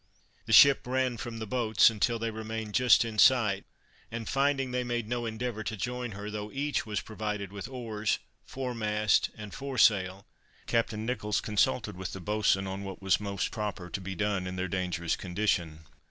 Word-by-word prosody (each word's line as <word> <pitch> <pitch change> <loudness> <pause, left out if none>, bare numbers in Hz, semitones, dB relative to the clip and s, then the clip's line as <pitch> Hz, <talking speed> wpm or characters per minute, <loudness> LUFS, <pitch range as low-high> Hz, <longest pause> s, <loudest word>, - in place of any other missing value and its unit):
The - - -3
ship 140 +2 +8
ran 130 -1 0
from 120 -1 -6
the 110 - -4
boats, 110 -1 +4
until 115 +2 0
they 115 0 -2
remained 110 -1 -5
just 125 -1 +5
in 110 -2 -4
sight; 105 -7 +5 0.4
and 115 -1 -5
finding 135 -1 +1
they 125 0 0
made 120 -2 -2
no 120 0 -2
endeavor 110 0 -3
to 110 - -3
join 125 +1 -3
her, 105 +2 -6
though 105 0 -5
each 145 -3 -1
was 105 -1 -2
provided 105 -2 -4
with 100 -2 -6
oars, 110 -5 -2 0.3
foremast 110 -5 0
and 105 -2 -8
foresail, 105 -8 +2 0.4
Captain 110 -2 0
Nicholls 105 -4 -1
consulted 105 0 0
with 95 0 -6
the 95 - -6
boatswain 105 0 +1
on 95 +1 -5
what 95 -1 -7
was 95 -2 +2
most 100 -2 -2
proper 105 -5 -4
to 100 - -3
be 95 +1 -5
done 100 0 -1
in 90 - -5
their 95 0 -2
dangerous 90 -2 -1
condition. 90 -4 -1
110 Hz, 180 wpm, -29 LUFS, 100-120 Hz, 0.4 s, ship